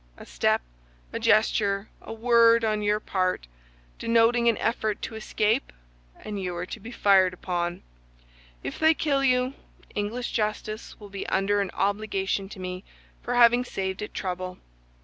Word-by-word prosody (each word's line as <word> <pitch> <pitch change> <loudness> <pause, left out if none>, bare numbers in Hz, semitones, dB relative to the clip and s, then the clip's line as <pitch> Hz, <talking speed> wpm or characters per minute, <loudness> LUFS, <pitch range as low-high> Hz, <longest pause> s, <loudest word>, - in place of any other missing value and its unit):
A - - -11
step, - - +1 0.5
a - - -2
gesture, 205 -1 +2
a - - -9
word, 230 0 +4
on 215 -1 0
your 210 0 +1
part, 185 - -1 0.5
denoting 235 +1 +3
an 230 - +1
effort 220 -2 -1
to - - -4
escape, 220 +2 0 0.5
and 205 -2 -5
you 180 -1 -3
are 175 +1 -3
to - - -7
be 225 - -9
fired 195 -5 +4
upon. 175 -1 -3 0.8
If - - -5
they 315 0 +5
kill 280 -3 +1
you, 255 0 +2 0.4
English 220 +4 -3
justice 215 0 -3
will 205 -1 -11
be 195 0 -6
under 200 +1 +1
an 195 - -2
obligation 195 -1 -1
to 200 - -10
me 185 0 -5 0.4
for 245 - -2
having 240 0 +6
saved 190 -4 -4
it 210 - -5
trouble. 185 -1 -4
210 Hz, 155 wpm, -26 LUFS, 190-230 Hz, 0.8 s, having